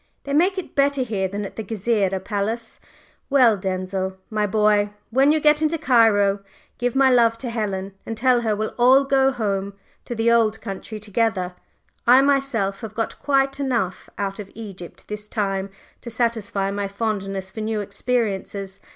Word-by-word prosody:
"They 280 - -4
make 365 +6 +3
it 375 - -5
better 280 -1 +2
here 205 -5 -1
than 200 +2 -4
at - - -9
the 220 - -3
Gezireh 200 -2 0
Palace. 220 +3 -3 0.5
Well, 255 -6 +5
Denzil, 190 0 -3
my 210 -1 +1
boy, 210 0 +2 0.2
when 270 +4 +4
you 310 - +3
get 300 0 +4
into 315 +1 +1
Cairo, 225 -9 +4 0.4
give 245 +1 -1
my 270 -1 +5
love 230 -2 +4
to 235 0 -5
Helen 200 -4 -3
and 225 - -6
tell 250 +1 +3
her 220 -2 0
we'll 215 +1 -3
all 260 +3 +6
go 270 -1 +3
home 200 -5 -2 0.3
to 240 - -5
the 230 +1 +2
old 220 -2 +3
country 200 +2 -7
together; 205 -3 -1 0.5
I, 250 +2 +8
myself, 270 -8 +1
have 220 -2 -7
got 225 -1 -3
quite 275 -1 +1
enough 235 -9 -2
out 195 0 -3
of 200 -2 -7
Egypt 195 -6 -10
this 210 0 -7
time 195 -3 -1 0.3
to 235 - -7
satisfy 225 -4 -1
my 200 0 -2
fondness 195 -2 -3
for 220 - -6
new 215 0 -1
experiences. 200 -3 -2
220 Hz, 170 wpm, -22 LUFS, 200-250 Hz, 0.5 s, I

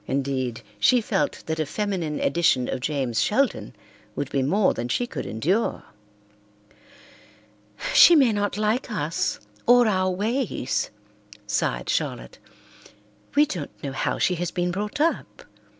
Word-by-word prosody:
Indeed, 130 -3 -2 0.2
she 250 - +5
felt 210 -3 -1
that 160 0 -3
a 155 - +1
feminine 180 -6 -2
edition 140 -5 +2
of - - -3
James 130 -4 -1
Sheldon 265 +5 0 0.4
would 140 - -4
be 135 - +1
more 190 +10 +2
than 120 - -4
she 185 - 0
could - - -6
endure. 180 - -1 2.1
"She 345 - +8
may 270 -7 +5
not 205 -1 -1
like 215 +5 0
us, 165 -6 -2 0.3
or 245 0 +6
our 185 -3 +1
ways," 210 - -1 0.6
sighed 65 -11 -1
Charlotte. - - -3 1.0
"We 295 +1 +6
don't 170 - -7
know 140 - -3
how 135 - -1
she 185 - +2
has 175 - -1
been 175 0 -1
brought 210 +9 -4
up. 325 +3 -1
180 Hz, 135 wpm, -24 LUFS, 140-215 Hz, 2.1 s, She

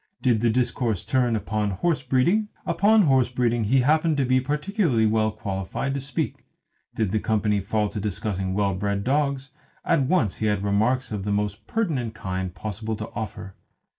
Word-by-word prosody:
Did 120 -5 +2
the 120 - +3
discourse 120 -3 0
turn 125 -3 +1
upon 105 -1 -1
horse 130 - 0
breeding, 140 - +2 0.2
upon 205 +5 +4
horse 130 -5 +3
breeding 120 -2 0
he 130 +5 +3
happened 155 +3 +2
to 135 - +2
be 130 +1 +3
peculiarly 150 - +1
well 110 0 +2
qualified 105 +4 -3
to 140 - -2
speak. 135 -1 -3 0.5
Did 110 -4 0
the 110 - +1
company 105 -1 +1
fall 105 +2 0
to 105 - -5
discussing 95 -2 -2
well 100 -1 +1
bred 100 +1 -2
dogs, 140 0 0 0.3
at - - +3
once 130 - +1
he 110 - -1
had 105 -2 0
remarks 110 +6 +1
of 105 -3 -3
the 105 - -2
most 105 +1 -2
pertinent 140 - -1
kind 95 -2 -3
possible 110 +4 -4
to 105 +1 -7
offer. 105 -3 -6
115 Hz, 175 wpm, -24 LUFS, 105-135 Hz, 0.5 s, upon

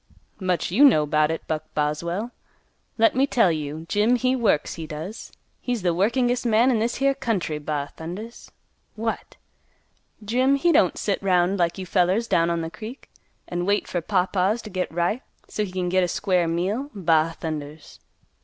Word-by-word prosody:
"Much 185 -3 -1
you 235 +10 +4
know 185 - +6
'bout 150 +1 +2
it, 160 - -4
Buck 155 -1 -2
Boswell. 170 +9 -1 0.7
Let 225 0 +4
me 270 +2 +3
tell 230 -10 +3
you, 155 0 -4
Jim 210 +6 +3
he 255 +2 +1
works, 215 - +1
he 160 -2 -7
does. 160 +8 -7 0.3
He's 245 -6 -2
the 175 -2 +2
workingest 240 +7 +1
man 235 +2 +4
in 230 - +1
this 230 +2 0
here 275 0 +2
county, 185 - -2
ba 145 -1 -4
thundas! 195 +9 -8 0.5
What! 225 +1 -4 0.9
Jim 255 +5 +3
he 340 +5 +2
don't 190 - +3
sit 200 - -1
'round 185 0 +2
like 170 +1 +1
you 190 - -5
fellers 185 +5 +2
down 170 -4 +2
on 165 -1 -1
th' 165 - -12
creek 230 +5 -9 0.4
an' 175 +1 -3
wait 205 +1 +1
fer 175 - -2
pawpaws 190 +4 +1
to 215 - -9
git 185 0 -2
ripe, 175 +8 0 0.3
so 210 - -2
he 195 - -5
can 185 -1 -2
git 185 +1 +2
a - - +1
square 180 -1 +1
meal, 195 - -1
ba 165 -3 +2
thundas!" 150 -2 -6
185 Hz, 180 wpm, -24 LUFS, 165-225 Hz, 0.9 s, know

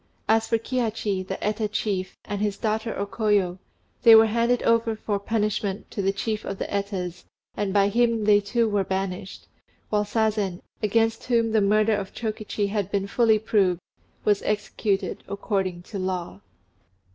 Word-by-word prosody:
As 225 0 +3
for 230 - +2
Kihachi, 225 -5 -1
the 190 +1 -5
Eta 210 +1 0
chief, 200 -2 -2
and 205 -1 -4
his 205 -2 0
daughter 220 0 -2
O 200 - -1
Koyo, 200 -4 +1 0.4
they 230 -2 +9
were 220 0 +8
handed 235 +2 +1
over 230 -1 +2
for 210 -1 -2
punishment 210 -1 -2
to 205 - -3
the 195 0 +2
chief 215 +2 -3
of 195 - -5
the - - -3
Etas, 190 -3 -3 0.3
and 205 -2 -1
by 200 0 +4
him 230 +1 +2
they 205 0 +5
too 225 +3 0
were 205 -2 +1
banished; 190 0 -4 0.4
while 210 -1 +2
Sazen, 210 -4 0 0.2
against 225 +1 +1
whom 230 -2 +2
the 220 -1 +3
murder 215 +2 +3
of 200 -2 -5
Chokichi 215 -2 -2
had 200 -2 -1
been 200 -1 -1
fully 220 +1 +3
proved, 200 -5 +1 0.5
was 205 -1 +3
executed 205 -1 -1
according 190 -3 -2
to 200 +2 -6
law. 180 - -3
210 Hz, 165 wpm, -25 LUFS, 195-220 Hz, 0.5 s, they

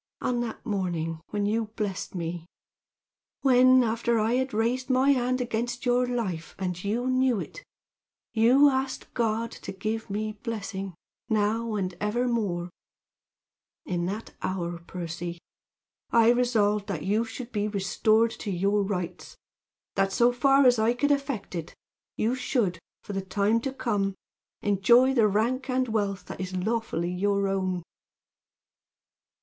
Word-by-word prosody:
"On 245 -1 0
that 240 -1 -4
morning 170 -7 -2
when 205 -1 -1
you 220 +2 +1
blessed 200 -3 -3
me 170 -1 -4 0.9
when, 255 -1 +6
after 230 +1 +1
I 220 +2 +2
had 260 +1 0
raised 240 +4 0
my 260 +2 +4
hand 255 -1 +1
against 240 +1 -2
your 245 0 +3
life, 205 -10 -3
and 180 -2 -3
you 225 +5 -1
knew 255 -3 +2
it, - - -8 0.7
you 245 +6 +6
asked 265 -1 -1
God 230 -1 0
to - - -8
give 215 +3 -3
me 215 +2 -2
blessing, 195 -5 -4 0.3
now 220 +1 +1
and 185 -3 -2
ever 235 +4 0
more 185 -7 -1 1.1
in 175 -1 -1
that 210 +4 -5
hour, 175 -2 -3
Percy, 170 0 -6 0.7
I 230 0 +5
resolved 215 -4 +2
that 170 -7 -3
you 210 +5 +1
should 235 +2 -7
be 210 -2 0
restored 215 +3 +2
to - - -4
your 200 +3 +1
rights; 185 -4 -4 0.6
that, 195 0 +1
so 240 +4 +4
far 270 +3 +4
as 245 -2 +5
I 225 +2 +3
could 285 +3 +1
effect 275 -8 -1
it, 165 -3 -5 0.4
you 225 +3 +1
should, 250 - 0 0.2
for 205 - -6
the 195 - -1
time 200 +4 +1
to 270 - -2
come, 205 -7 -1 0.5
enjoy 235 +6 +5
the 230 -5 +4
rank 240 +6 0
and 255 0 +1
wealth 200 -3 -1
that - - -7
is 185 0 -4
lawfully 190 -3 -1
your 200 +1 +1
own. 185 -2 -1
220 Hz, 145 wpm, -27 LUFS, 195-245 Hz, 1.1 s, when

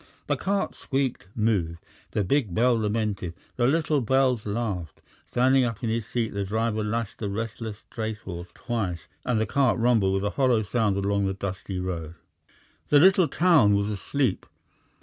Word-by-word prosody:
The - - +1
cart 200 +1 -1
squeaked, 130 -7 -2
moved. 100 -7 0 0.4
The 105 - +1
big 105 -3 0
bell 125 +2 +4
lamented, 105 -5 -1 0.2
the 120 -1 +2
little 155 0 +2
bells 130 -2 +2
laughed. 100 - -3 0.3
Standing 130 +2 +4
up 115 -1 -3
in 115 - 0
his 115 -2 -2
seat 115 -3 -2
the 100 0 -1
driver 110 +2 -1
lashed 110 0 -3
the 105 - -2
restless 110 0 -5
tracehorse 100 -6 -5
twice, 95 -8 -3 0.2
and 120 -3 +1
the 110 - +1
cart 130 +3 +2
rumbled 115 -5 +3
with 95 - -1
a 100 - 0
hollow 125 -5 +2
sound 105 -2 0
along 100 0 +1
the 95 - -2
dusty 95 0 -5
road. 85 -3 -4 0.7
The 145 - +6
little 185 +2 +6
town 155 - +4
was 100 +1 0
asleep. 105 +3 -1
110 Hz, 165 wpm, -26 LUFS, 100-125 Hz, 0.7 s, The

